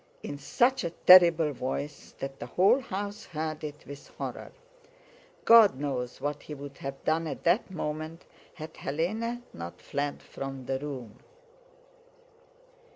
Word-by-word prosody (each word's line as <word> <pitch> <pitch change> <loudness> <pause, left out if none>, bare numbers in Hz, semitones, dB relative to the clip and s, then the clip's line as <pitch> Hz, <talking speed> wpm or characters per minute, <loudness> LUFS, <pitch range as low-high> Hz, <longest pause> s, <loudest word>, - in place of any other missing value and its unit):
in - - -5
such 245 - +1
a 170 - -1
terrible 170 -3 +7
voice 140 +3 -5
that 135 0 -6
the 120 - -6
whole 190 - +4
house 205 -2 -5
heard 155 -2 -4
it 150 -1 -7
with 140 0 -10
horror. - - -6 0.9
God 220 - +7
knows 130 -4 -3
what 145 0 -3
he 150 - -8
would 140 0 -10
have 135 0 -6
done 160 +1 +1
at - - -6
that 175 +6 +2
moment 155 -1 -5 0.3
had 160 -2 -8
Hélène 220 - -2
not 85 +1 -8
fled 145 0 -3
from 135 -1 -7
the 135 0 -1
room. 130 -6 -7
150 Hz, 140 wpm, -29 LUFS, 135-180 Hz, 0.9 s, terrible